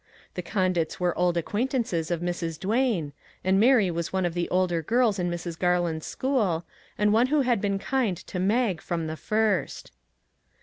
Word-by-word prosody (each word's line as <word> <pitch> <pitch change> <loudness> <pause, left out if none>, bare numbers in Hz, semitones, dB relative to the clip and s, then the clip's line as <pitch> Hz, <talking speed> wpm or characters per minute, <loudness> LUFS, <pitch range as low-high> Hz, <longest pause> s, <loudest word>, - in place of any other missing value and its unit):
The - - -4
Condits 185 -5 -1
were 180 -1 0
old 175 -1 +1
acquaintances 210 - -1
of 170 -1 -1
Mrs. 170 -2 -3
Duane, 205 - 0 0.3
and 190 +1 +3
Mary 225 -5 +5
was 170 0 -3
one 190 -1 0
of 175 - -1
the 175 0 -2
older 180 -2 +1
girls 225 +2 +2
in 175 0 0
Mrs. 170 -1 -5
Garland's 175 -3 0
school, 210 -12 0 0.3
and 210 0 +3
one 235 +3 +4
who 295 +2 +2
had 245 -6 +1
been 200 -1 0
kind 225 -3 0
to 185 0 -6
Mag 200 -2 +1
from 170 -2 -3
the 160 0 -4
first. 215 +5 -1
185 Hz, 175 wpm, -26 LUFS, 170-220 Hz, 0.3 s, Mary